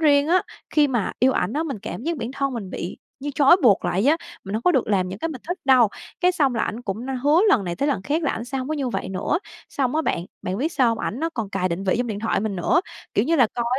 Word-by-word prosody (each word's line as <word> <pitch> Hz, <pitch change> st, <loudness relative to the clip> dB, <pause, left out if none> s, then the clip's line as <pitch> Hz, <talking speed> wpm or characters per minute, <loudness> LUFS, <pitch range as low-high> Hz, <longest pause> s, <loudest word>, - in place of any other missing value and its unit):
riêng 290 Hz, -2 st, +4 dB
á." 365 Hz, +2 st, +4 dB, 0.3 s
Khi 295 Hz, -2 st, +4 dB
mà 240 Hz, -6 st, -1 dB
yêu 260 Hz, +2 st, +4 dB
ảnh 180 Hz, -2 st, 0 dB
á, 305 Hz, -, 0 dB
mình 280 Hz, -8 st, -4 dB
cảm 225 Hz, -, -6 dB
giác 335 Hz, +1 st, -1 dB
bản 235 Hz, -3 st, -4 dB
thân 275 Hz, -1 st, -1 dB
mình 205 Hz, -6 st, -5 dB
bị 175 Hz, -, -5 dB, 0.2 s
như 290 Hz, +2 st, -3 dB
trói 290 Hz, +4 st, +6 dB
buộc 210 Hz, -6 st, +5 dB
lại 190 Hz, -, +1 dB
vậy 280 Hz, -, +5 dB
á, 320 Hz, -, +4 dB, 0.3 s
mình 195 Hz, +1 st, -5 dB
hổng 220 Hz, -, -1 dB
có 360 Hz, -, +4 dB
được 265 Hz, -6 st, +2 dB
làm 190 Hz, -3 st, +1 dB
những 190 Hz, +2 st, -6 dB
cái 330 Hz, -, -2 dB
mình 275 Hz, -7 st, -7 dB
thích 355 Hz, +2 st, -2 dB
đâu, 255 Hz, -4 st, +6 dB, 0.3 s
cái 360 Hz, 0 st, +4 dB
xong 285 Hz, -7 st, +2 dB
là 230 Hz, -, 0 dB
ảnh 230 Hz, +3 st, -5 dB
cũng 215 Hz, +1 st, -4 dB
n -, -, -7 dB
hứa 295 Hz, +4 st, +5 dB
lần 235 Hz, -, +4 dB
này 175 Hz, -1 st, -3 dB
tới 285 Hz, -, 0 dB
lần 270 Hz, -9 st, 0 dB
khác 300 Hz, -, -1 dB
là 290 Hz, -, +1 dB
ảnh 225 Hz, -, -4 dB
sẽ 265 Hz, +2 st, -4 dB
hông 260 Hz, +1 st, -4 dB
có 310 Hz, -, -1 dB
như 275 Hz, -4 st, -1 dB
vậy 235 Hz, -, -3 dB
nữa. 190 Hz, -, -1 dB, 0.3 s
Xong 265 Hz, 0 st, -1 dB
á 320 Hz, -, +2 dB
bạn, 170 Hz, -, -1 dB, 0.2 s
bạn 185 Hz, +1 st, -2 dB
biết 310 Hz, +6 st, -1 dB
sao 255 Hz, -4 st, +3 dB
hông? 230 Hz, -1 st, 0 dB
Ảnh 235 Hz, -, -3 dB
nó 325 Hz, -, 0 dB
còn 220 Hz, -5 st, -3 dB
cài 190 Hz, -2 st, 0 dB
định 175 Hz, +3 st, -3 dB
vị 190 Hz, -, +2 dB
trong 245 Hz, -, 0 dB
điện 210 Hz, -3 st, -4 dB
thoại 220 Hz, -3 st, 0 dB
mình 205 Hz, -2 st, -2 dB
nữa, 185 Hz, -, +2 dB, 0.3 s
kiểu 205 Hz, -, +3 dB
như 330 Hz, +5 st, +2 dB
là, 255 Hz, -5 st, +6 dB
coi 240 Hz, -, -1 dB
250 Hz, 315 wpm, -23 LUFS, 205-290 Hz, 0.3 s, trói